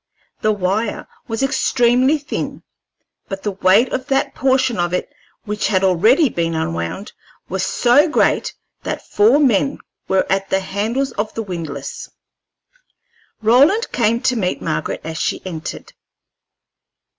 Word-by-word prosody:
The 215 - +2
wire 205 +2 -1 0.2
was 225 +3 -2
extremely 255 +1 +2
thin, 290 0 -5 0.7
but 195 0 -5
the 205 - -1
weight 195 +5 +3
of 260 0 -3
that 270 0 0
portion 260 -4 +1
of 175 0 0
it 235 - -4 0.3
which 210 0 -2
had 195 -2 +1
already 215 - +4
been 165 -7 -2
unwound 85 - -3 0.4
was 185 +1 -2
so 255 - +3
great 305 - +1 0.3
that - - -5
four 220 +7 +4
men 275 -1 +2 0.3
were 190 0 +2
at 195 0 -1
the 190 - +1
handles 220 +8 -2
of 210 +1 -3
the 225 - -2
windlass. 160 -8 -6 1.3
Roland 280 - +4
came 230 -1 +1
to 255 - +1
meet 185 -6 -1
Margaret 155 -2 -3
as 160 0 -5
she - - -2
entered. 165 -4 -7
210 Hz, 135 wpm, -19 LUFS, 185-255 Hz, 1.3 s, already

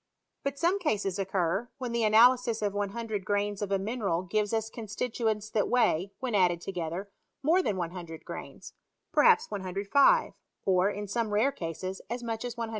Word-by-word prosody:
But 280 0 -2
some 350 +6 +2
cases 205 - -1
occur, 190 +3 0
when 250 -3 -4
the 235 -1 0
analysis 230 +1 +5
of 205 -1 0
100 205 +1 -3
grains 205 +1 -1
of 200 -1 -3
a 195 - +3
mineral 195 -4 -1
gives 205 +2 0
us 220 -1 -1
constituents 220 -1 -2
that 210 - +1
weigh, 200 -6 +2
when 255 -3 -3
added 180 -4 +3
together, 180 +2 -5 0.3
more 335 +6 +4
than 205 - -1
100 170 -2 -6
grains; - - -8 0.4
per - - +4
haps 470 0 +5
105, 200 - +3 0.3
or, 185 0 +3
in 205 0 -5
some 225 +2 -1
rare 220 +7 +3
cases, 185 - -5
as 240 +1 -4
much 225 -1 -3
as 240 -1 -5
110. 230 -1 -3
210 Hz, 175 wpm, -29 LUFS, 190-240 Hz, 0.4 s, analysis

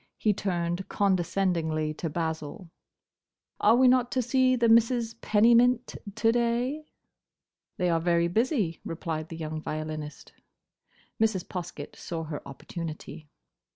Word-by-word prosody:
He 215 - +2
turned 175 -2 -2
condescendingly 175 -5 0
to 165 +1 -4
Basil. 160 +1 -4 0.9
"Are 220 +2 +5
we 255 +1 +5
not 250 -1 +3
to 255 - +1
see 255 +1 +3
the 235 -1 +2
Misses 230 0 +3
Pennymint 235 +3 +4 0.2
to 225 0 +3
day?" 240 +6 0 0.9
"They 180 - +1
are 165 - +2
very 170 0 +2
busy," 215 - 0
replied 160 -1 -4
the 165 - -7
young 155 -1 -4
violinist. 155 -1 -6 0.9
Mrs. 215 -5 +1
Poskett 170 -5 -7
saw 165 -2 -5
her 155 -2 -6
opportunity. 155 +2 -8
180 Hz, 120 wpm, -27 LUFS, 160-235 Hz, 0.9 s, Are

